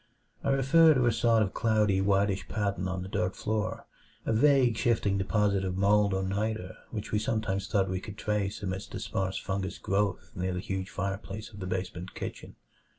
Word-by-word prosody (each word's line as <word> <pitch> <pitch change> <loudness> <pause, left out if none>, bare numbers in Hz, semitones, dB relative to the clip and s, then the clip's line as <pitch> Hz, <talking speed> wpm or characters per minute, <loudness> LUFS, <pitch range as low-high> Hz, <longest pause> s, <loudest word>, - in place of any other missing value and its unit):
I - - 0
refer 150 +4 +5
to 125 -2 +3
a 120 - +4
sort 115 0 +3
of 95 - -3
cloudy 105 -4 +2
whitish 100 0 +1
pattern 100 -3 -1
on 95 0 -3
the - - -6
dirt 95 -1 -1
floor 110 -1 -2 0.4
a - - +1
vague, 130 -1 +4
shifting 105 -4 +1
deposit 100 0 +1
of 95 -1 -2
mold 100 0 +3
or 95 - 0
niter 100 -1 -2
which 105 -2 -5
we 105 - +2
sometimes 110 -3 -1
thought 95 -2 +2
we 95 0 -2
could 105 0 -8
trace 105 -1 -2
amidst 95 0 -4
the - - -3
sparse 95 0 -2
fungous 95 -1 -3
growths 100 -1 -1
near 90 0 -2
the - - -2
huge 95 0 -3
fireplace 100 +2 -4
of 100 - -10
the 95 - -4
basement 90 -1 -4
kitchen. - - -7
100 Hz, 190 wpm, -29 LUFS, 95-110 Hz, 0.4 s, refer